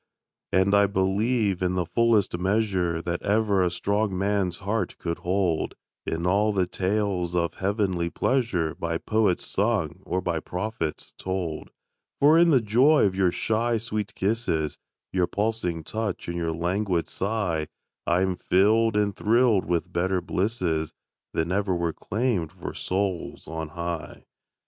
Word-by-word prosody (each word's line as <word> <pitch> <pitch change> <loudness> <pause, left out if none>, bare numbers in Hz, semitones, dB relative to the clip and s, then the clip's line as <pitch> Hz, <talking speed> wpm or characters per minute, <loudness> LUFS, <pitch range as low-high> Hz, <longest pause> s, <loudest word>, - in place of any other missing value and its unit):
And 95 +2 +3
I 100 0 +5
believe, 100 +1 +1
in 90 0 +1
the 90 -1 0
fullest 110 -4 +2
measure 95 -4 0
That 85 0 -2
ever 105 -1 +2
a 90 - +3
strong 100 +2 -1
man's 95 -3 0
heart 105 +4 -2
could 85 -1 -3
hold, 90 -3 0 0.3
In 80 +1 -2
all 100 +4 +3
the 95 -2 +2
tales 95 -1 -1
of 85 -1 0
heavenly 95 -3 0
pleasure 95 -8 0
By 85 0 -2
poets 105 -2 +1
sung 95 -5 0
or 90 - -1
by 85 -3 -1
prophets 90 -2 -4
told; 90 -4 -3 0.5
For 150 +3 +6
in 170 0 +6
the 135 -6 +5
joy 125 +8 +4
of 95 - +1
your 95 -2 +2
shy, 115 +5 0
sweet 110 -2 -4
kisses, 95 -7 -1 0.3
Your 90 -2 +2
pulsing 100 -4 -1
touch 110 +1 -3
and 85 - -3
your 85 -1 -1
languid 90 +1 -1
sigh 95 -7 -1 0.4
I 85 +2 +3
am 95 -1 0
filled 110 +4 +3
and 100 -2 +1
thrilled 115 -2 +3
with 90 +1 -1
better 95 +2 +1
blisses 90 -5 -1 0.4
Than 80 +2 -1
ever 95 -1 +1
were 85 -1 -1
claimed 100 -3 -1
for 95 -1 -7
souls 95 -1 -3
on 80 0 -4
high. 85 -2 -5
95 Hz, 150 wpm, -26 LUFS, 85-105 Hz, 0.5 s, For